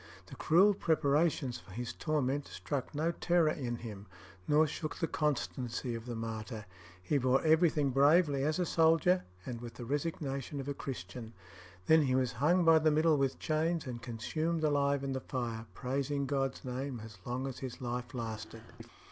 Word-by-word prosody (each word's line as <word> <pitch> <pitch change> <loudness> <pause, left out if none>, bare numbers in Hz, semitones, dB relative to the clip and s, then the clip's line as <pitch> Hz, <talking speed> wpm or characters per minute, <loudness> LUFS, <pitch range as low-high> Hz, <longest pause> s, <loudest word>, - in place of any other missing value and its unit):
The - - -11
cruel 190 +6 +5
preparations 150 -6 +1
for 95 - -15
his 120 +2 -4
torment 145 -2 -1
struck 140 0 -4
no 160 +3 +1
terror 170 -2 +2
in 125 -6 -3
him, 105 -4 -8 0.4
nor 150 +1 +5
shook 155 +1 -4
the - - -1
constancy 130 -5 -2
of 115 +1 -6
the 120 - -4
martyr. 110 0 -5 0.4
He 140 +9 +1
bore 130 +1 +2
everything 155 -3 +4
bravely 145 +1 +4
as 155 +2 +1
a 180 - +1
soldier, 165 +2 +3 0.2
and 120 -2 -5
with 120 -1 -8
the 120 - -7
resignation 140 -1 -3
of 135 - -5
a 140 - -1
Christian. 115 -3 -7 0.5
Then 160 0 +6
he 130 -3 +1
was 130 -2 +1
hung 160 +9 +2
by 165 -1 +7
the 155 0 +3
middle 155 0 +3
with 135 -1 0
chains 160 +1 0
and 120 -3 -6
consumed 155 +8 -2
alive 140 -2 +2
in 135 -1 -2
the 130 - -2
fire, 115 -3 -4
praising 140 +2 -1
God's 135 -1 -2
name 130 0 -4
as 110 -3 -12
long 125 +4 -3
as 135 -2 -5
his 130 -2 -6
life 125 +1 -4
lasted. 110 -1 -6
135 Hz, 175 wpm, -32 LUFS, 120-155 Hz, 0.5 s, by